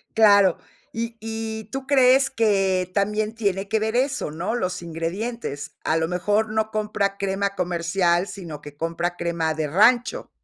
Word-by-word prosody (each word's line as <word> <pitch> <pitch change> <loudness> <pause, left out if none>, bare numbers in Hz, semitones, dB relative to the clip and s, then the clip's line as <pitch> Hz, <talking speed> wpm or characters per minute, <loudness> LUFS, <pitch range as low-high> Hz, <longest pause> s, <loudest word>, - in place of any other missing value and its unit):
Claro. 200 -5 +6 0.4
Y 230 0 -4
y, 220 0 -5
¿tú 270 0 -4
crees 270 0 +5
que 195 -6 +1
también 210 +2 0
tiene 200 -3 -1
que 220 +2 +1
ver 220 +2 -1
eso, 260 - 0
no? 180 +9 -3
Los 185 -5 -2
ingredientes, 170 - -4
a 160 - +1
lo 160 0 0
mejor, 205 +5 0
no 220 0 -1
compra 210 -2 -1
crema 195 0 -1
comercial, 175 0 +1
sino 165 -8 -8
que 145 -1 -12
compra 170 +2 -2
crema 170 -2 -1
de 155 0 -2
rancho. 225 - +3
200 Hz, 155 wpm, -23 LUFS, 175-220 Hz, 0.4 s, Claro